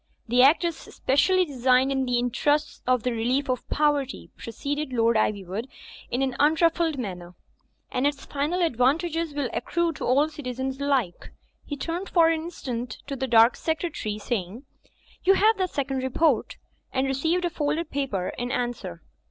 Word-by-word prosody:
"The 245 +2 +4
act 285 +7 +6
is 340 -2 0
specially 365 +9 +1
designed 260 -2 +2
in 265 -1 0
the 245 -1 +1
interests 290 +5 0
of 255 -3 +2
the 250 - 0
relief 250 +5 0
of 250 - -4
poverty," 290 -3 0
proceeded 285 +5 -4
Lord 230 -1 +2
Ivyivood, 205 +1 -1 0.4
in 250 +3 0
an 260 -2 -1
unruffled 320 +1 +3
manner, 180 -7 -6 0.6
"and 255 +3 +1
its 285 -1 -3
final 305 +6 -1
advantages 325 +4 +1
will 280 -5 -2
accrue 340 -1 0
to - - -7
all 280 +4 +3
citizens 265 -3 -5
alike." 260 -11 -1 0.4
He 290 - -4
turned 345 +6 -4
for 330 -2 +5
an 325 -1 0
instant 250 -8 -5
to 280 - -4
the 265 0 -2
dark 230 0 +6
secretary, 320 - -3
saying, 215 +1 -4 0.6
"You 390 +1 +5
have 430 +1 +3
that 370 -1 +1
second 270 -3 -2
re 260 0 -2
port?" 320 +5 +1 0.3
and 265 0 0
received 320 +7 0
a 345 - -1
folded 305 +1 -2
paper 255 -10 -2
in 245 0 -2
answer. 230 -10 -3
270 Hz, 165 wpm, -25 LUFS, 245-315 Hz, 0.6 s, act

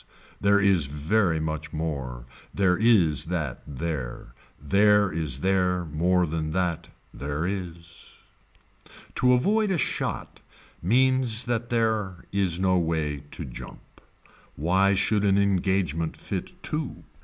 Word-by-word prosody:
There 100 0 +4
is 95 -7 +3
very 80 +4 +1
much 80 -1 -4
more. 70 -7 -4 0.3
There 95 -2 +2
is 95 - +3
that 80 -7 -3
there. 75 -3 -5 0.3
There 100 +6 +4
is 75 -5 -3
there 90 -2 +1
more 90 +4 +1
than 80 -1 -3
that. 90 -2 -1 0.3
There 70 +3 -3
is. 85 -3 -6 1.0
To 125 0 +3
avoid 210 - +2
a 190 - +1
shot - - -3 0.4
means 125 +3 +2
that 120 -1 -2
there 110 -6 -1
is 95 -3 0
no 95 -1 +3
way 80 -4 -1
to 80 - -7
jump. - - -11 0.5
Why 95 +6 +2
should 105 +1 +1
an 100 -1 +3
engagement 95 -5 0
fit - - -5
two. 150 -4 -4
90 Hz, 120 wpm, -26 LUFS, 80-100 Hz, 1.0 s, There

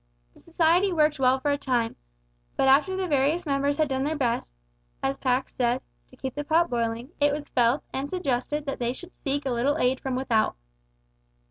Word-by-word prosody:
The - - -20
society 340 +3 +2
worked 305 -3 +2
well 260 0 +3
for 290 +2 0
a 285 - 0
time, 240 -4 0 0.6
but - - +3
after 295 +8 +4
the 375 -1 -1
various 300 +3 +1
members 280 0 0
had 310 -1 +2
done 265 -1 -1
their 305 +3 -1
best, 235 - -1 0.5
as 135 - +1
Pax 255 0 0
said, 245 0 +1 0.3
to - - -17
keep 265 -1 -5
the 290 - -4
pot 325 +2 +2
boiling, 235 +2 -2
it 290 0 +4
was 290 0 -4
felt 245 +3 +2
and 275 +2 -3
suggested 295 -4 -2
that 275 - -4
they 240 0 0
should 355 +7 -10
seek 285 0 -3
a 265 - 0
little 250 +5 +1
aid 255 +1 +1
from 265 -2 -3
without. 240 -4 +1
275 Hz, 200 wpm, -26 LUFS, 250-300 Hz, 0.6 s, after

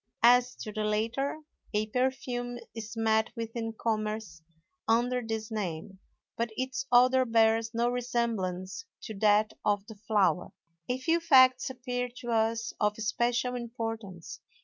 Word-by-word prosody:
As 245 +1 +5
to 215 - -7
the 215 +1 -3
latter, 230 +8 -1 0.3
a 210 +1 +2
perfume 245 0 -2 0.2
is 225 0 -7
met 220 0 +2
with 230 0 -5
in 225 -1 -3
commerce 215 -5 -3 0.5
under 245 +2 +2
this 225 -1 -4
name, 190 -2 -4 0.4
but 235 0 -1
its 260 +1 -3
odor 255 +1 +6
bears 225 -1 +2
no 235 +1 +2
resemblance 235 - -2 0.2
to 220 - -6
that 215 +1 +4
of 205 -1 +1
the 220 - -10
flower. 195 -4 +2 0.4
A 250 - +1
few 330 +6 +1
facts 260 -6 +5
appear 250 -1 -3
to 240 -2 -5
us 225 0 0
of 210 0 +1
especial 240 +3 0
importance. 225 -7 -5
230 Hz, 140 wpm, -29 LUFS, 215-245 Hz, 0.5 s, odor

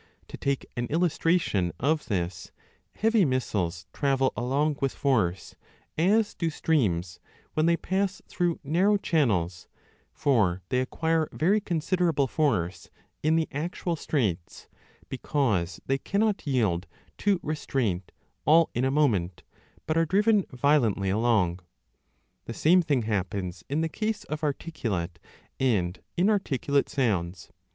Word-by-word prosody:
To - - -7
take 140 -1 -1
an 120 0 -2
illus 165 +3 +1
tration 135 - +1
of 150 +4 0
this; 90 -4 -3 0.4
heavy 225 -1 +3
missiles 100 - -1
travel 135 -2 +1
along 140 +6 0
with 135 -1 0
force, 105 -10 0 0.4
35 190 +7 +4
as 215 -2 -2
do 165 - -1
streams 100 - 0 0.3
when 155 +1 +2
they 170 0 +3
pass 190 +1 -1
through 175 -2 -1
narrow 185 +8 +3
channels, 100 - 0 0.4
for 100 -10 +1
they 125 - +1
acquire 160 +4 0
very 200 +7 +2
considerable 170 -4 +1
force 120 - -1 0.3
in 155 +1 +2
the 165 -1 +1
actual 170 +3 -3
straits, 105 - -2 0.4
because 105 - -1
they 135 +1 0
cannot 205 -2 0
yield 105 -10 +1 0.3
to 200 -3 +2
restraint 120 - -2 0.3
all 160 +3 +5
in 120 - -1
a 130 - +2
moment, 110 - +1 0.4
but 155 - 0
arc 165 -1 +2
driven 210 +2 +4
violently 125 -8 +2
along. 105 -5 +2 0.9
The 115 - -6
same 180 +4 +5
thing 145 -7 0
happens 95 -3 -3
in 145 +3 0
the 165 - +1
case 215 +6 -3
of 155 +1 -6
articulate 115 - -3 0.4
and 95 -9 0 0.2
inarticulate 170 - +1
sounds. 95 -9 -1
140 Hz, 130 wpm, -27 LUFS, 100-165 Hz, 0.9 s, all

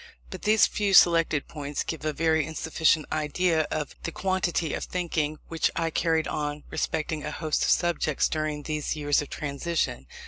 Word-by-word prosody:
But - - -7
these 215 +1 +5
few 200 -2 +1
selected 165 -4 +5
points 145 -2 -4
give 160 -2 -5
a 155 - 0
very 160 0 +2
insufficient 160 +1 +1
idea 155 +1 +1
of 150 -2 -3
the 170 - -4
quantity 180 -3 -1
of - - -3
thinking 160 -4 -2
which 165 -1 +1
I 165 -1 0
carried 160 0 +1
on 150 0 -3
respecting 155 -1 -2
a 150 - -3
host 155 0 -1
of - - +1
subjects 170 -4 +2
during 155 -1 -2
these 150 0 -2
years 145 -1 +1
of 145 - -7
transition. 145 - -2
155 Hz, 170 wpm, -27 LUFS, 150-165 Hz, -, these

